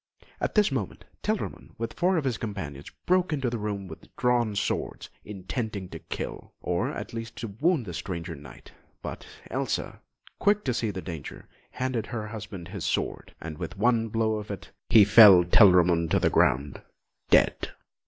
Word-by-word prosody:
At - - -2
this 210 -6 +4
moment, 120 -9 -4 0.2
Telramund, 70 +5 -3
with 115 0 -4
four 180 +1 +2
of 160 - 0
his 125 -5 -1
companions, 80 -11 -6 0.2
broke 180 -1 +2
into 135 -5 -1
the 120 - -3
room 100 -2 -3
with 80 - -13
drawn 120 -4 +1
swords, 100 - -2
intending 105 -1 -5
to - - -8
kill, - - -7
or, 90 0 -1
at - - -6
least, 115 0 -6
to 115 - -5
wound 165 -6 +2
the 90 - -6
stranger 85 0 -5
Knight; 70 -4 -13 0.3
but - - -7 0.2
Elsa, - - -2 0.4
quick 210 0 +3
to 130 - 0
see 115 -1 -1
the 95 -2 -5
danger, 80 -5 -8 0.3
handed 125 -4 -2
her 110 -3 -4
husband 105 -5 -8
his 100 -3 -6
sword, - - -2
and 80 -2 -7
with 90 - -6
one 115 +1 +2
blow 110 0 0
of 105 0 -7
it, 100 - -7 0.2
he 110 -3 +8
felled 100 -5 +8
Telramund 90 -5 +6
to - - +3
the - - +2
ground, 70 +2 +2 0.5
dead. - - +3
105 Hz, 175 wpm, -27 LUFS, 90-120 Hz, 0.5 s, he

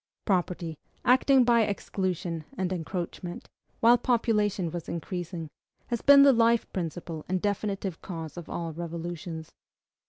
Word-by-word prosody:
Property, 175 -5 -1 0.3
acting 260 +1 +5
by 235 -1 +4
exclusion 185 -5 -2
and 185 0 -1
encroachment, 175 0 -5 0.3
while 235 +1 +6
population 210 -7 +1
was 170 -1 -6
increasing, 170 -1 -4 0.4
has 235 -2 -1
been 280 0 +8
the 280 -1 +7
life 230 0 +4
principle 165 -2 -4
and 185 0 +1
definitive 200 -2 -2
cause 165 -4 -6
of 175 -2 -8
all 165 -2 -4
revolutions. 170 0 -6
185 Hz, 125 wpm, -28 LUFS, 170-220 Hz, 0.4 s, been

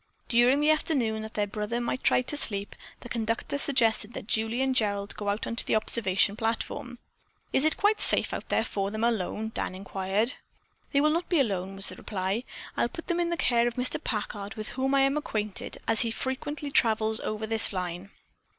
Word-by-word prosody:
During 245 +4 +4
the 300 +1 +4
afternoon, 250 -8 +1
that 220 0 -8
their 210 - +1
brother 210 +3 -3
might 240 +2 -2
try 250 - +4
to 280 - -2
sleep, 200 -7 +2 0.3
the - - -9
conductor 230 +4 -2
suggested 230 -5 +2
that - - -7
Julie 225 +4 0
and 265 0 +1
Gerald 200 -3 +1
go 205 -1 -3
out 205 +2 -1
on 230 - -4
the - - 0
observation 200 -2 +2
platform. 230 +2 -3 0.6
"Is 265 - +5
it 315 - +3
quite 420 +1 +2
safe - - +5 0.4
for 195 -1 -2
them 215 +2 -4
out 235 - +4
there 220 -5 -1
alone?" 220 +4 -4
Dan 185 - -2
inquired. 195 +5 -1 0.6
"They 280 - +3
will 305 +1 +3
not 335 +3 -1
be 345 - +3
alone," 195 -6 -1
was 195 0 +4
the 185 - -7
reply. 195 +4 -3 0.3
"I'll 235 - +1
put 330 +8 -9
them 345 0 +1
in 345 -1 +1
the 340 - -1
care 240 -5 +3
of 240 - -3
Mr. 255 +4 -1
Packard, 205 -2 -4
with 215 -1 -5
whom 265 +1 0
I 275 - +4
am 275 +2 +2
acquainted, 215 -8 -3
as 225 - +2
he 230 - +1
frequently 280 +5 -4
travels 220 -3 +2
over 215 0 -3
this 220 0 +4
line." 180 0 -4
225 Hz, 205 wpm, -27 LUFS, 205-265 Hz, 0.6 s, Is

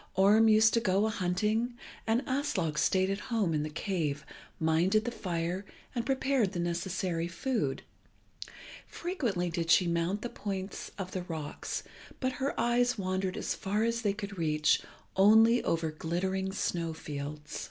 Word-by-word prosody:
Orm 210 +4 +6
used 220 0 +6
to 230 - +4
go 195 -1 +2
a 220 - 0
hunting, 215 +5 0 0.3
and 230 +4 +2
Aslog 215 - -1
stayed 190 +5 +2
at 195 - -2
home 215 -8 +1
in 150 - +1
the 155 - -3
cave, 155 -3 -2 0.3
minded 175 +7 +2
the 240 - -1
fire, 180 -3 -2 0.3
and 235 -2 -2
prepared 265 -6 +1
the 175 - -3
necessary 175 0 -1
food. 205 - -2 1.0
Frequently 230 - -2
did 165 -1 -2
she 180 - +6
mount 170 +4 0
the 240 - -3
points 195 -3 -5
of 190 -2 -5
the 185 - -3
rocks, 160 -4 -5 0.4
but 260 -1 0
her 275 - -1
eyes 245 +1 +2
wandered 185 -1 -1
as - - -1
far 205 +3 -1
as 230 0 0
they 205 -3 +1
could 200 -2 -6
reach 155 -2 +2 0.3
only 220 +4 +6
over 165 -1 0
glittering 190 +5 -2
snow 170 -4 -2
fields. 150 0 -6
190 Hz, 155 wpm, -31 LUFS, 170-220 Hz, 1.0 s, Orm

